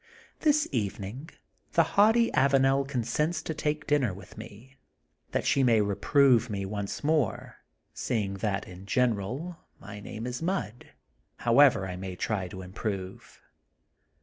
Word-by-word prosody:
This 300 -1 +3
evening 105 - -4 0.4
the 165 - +5
haughty 225 +3 +4
Avanel 135 0 +3
consents 150 +6 -1
to 160 - -3
take 150 0 -2
dinner 135 -10 +1
with 95 -1 -13
me, 130 +7 -12 0.5
that - - -2
she 140 - +3
may 120 -4 +4
reprove 120 +4 +3
me 100 -2 -3
once 100 +4 -4
more, 150 -8 0 0.4
seeing 105 -5 -2
that, 100 0 -2
in 90 +2 -11
general, 125 - -1 0.2
my 100 0 -9
name 110 +2 -7
is 125 +3 -4
mud, 165 - -3 0.5
however 120 -4 +4
I 90 -1 -5
may 95 0 -6
try 95 -1 -2
to 95 +1 -8
improve. 95 0 -6
120 Hz, 135 wpm, -28 LUFS, 100-145 Hz, 0.5 s, the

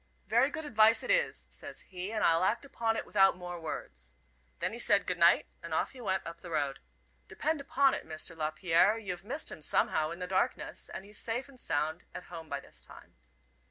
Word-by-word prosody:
'Very 235 +7 +4
good 315 0 -5
advice 220 -4 +5
it - - 0
is,' - - +1
says - - -8
he, 185 +2 -6
'and 215 -1 -1
I'll 165 +1 +4
act 225 +8 +1
upon 225 -4 -1
it - - -3
without 195 -3 +4
more 175 -1 -6
words.' 60 - -7 0.4
Then 185 +4 -1
he 235 - -6
said 205 -4 +4
'good 180 -1 -1
night,' 170 0 +6 0.2
and 170 -2 -4
off - - 0
he 260 - -11
went 190 -4 -1
up 170 0 -8
the 175 - -9
road. 140 -4 -1 0.5
Depend 310 -1 -1
upon 275 -1 +3
it, - - -3
Mr. 160 +1 -4
Lapierre, 165 +6 +3
you've 185 -5 -5
missed 275 +9 -2
him - - -8
somehow 155 +1 +2
in 170 - -6
the 180 - -4
darkness, 185 +1 -1
and 190 - -7
he's 210 +1 -4
safe 235 +4 -2
and 270 -2 -15
sound 155 -1 -1
at - - -6
home 165 -2 -8
by 140 - -2
this - - -12
time." - - -14
185 Hz, 215 wpm, -31 LUFS, 165-225 Hz, 0.5 s, night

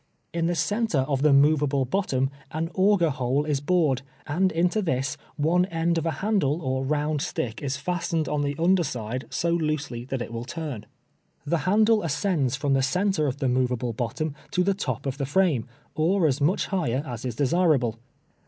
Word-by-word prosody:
In 165 0 0
the 175 - 0
centre 170 - +1
of 135 -2 0
the 150 0 +5
movable 140 -1 +4
bottom 135 -4 0 0.2
an. 165 +2 -3
auger 190 -4 +3
hole 135 +2 0
is 150 -3 0
bored, 150 -5 +2 0.2
and 185 +5 +1
into 180 +6 +1
this 135 -7 -1 0.2
one 170 +4 +2
end 170 -1 0
of 165 - -3
a - - +1
handle 180 -9 +1
or 130 0 -1
round 150 +1 0
stick 115 -5 -3
is 140 -1 -2
fastened 170 -1 -1
on 150 -1 0
the 145 0 -1
under 175 +2 +3
side 125 -3 -4
so 170 - 0
loosely 155 -7 -1
that 135 0 -3
it 115 - -9
will 115 0 -4
turn. 135 -6 -6 0.6
The 165 +3 +1
handle 215 +2 +4
ascends 150 -4 0
from 140 0 0
the 135 - +3
centre 175 +3 +1
of 135 0 -2
the 135 - -1
movable 125 -1 0
bottom 125 +7 -3 0.2
to 180 -3 +1
the 200 +2 +2
top 140 - -3
of 135 +1 -3
the 140 - -1
frame, 150 -6 +2 0.3
or 170 +3 +2
as 145 -2 +1
much 160 +7 +2
higher 150 -9 -1
as 120 -4 -6
is 125 -3 -3
desirable. 135 -5 +2
150 Hz, 190 wpm, -25 LUFS, 130-170 Hz, 0.6 s, the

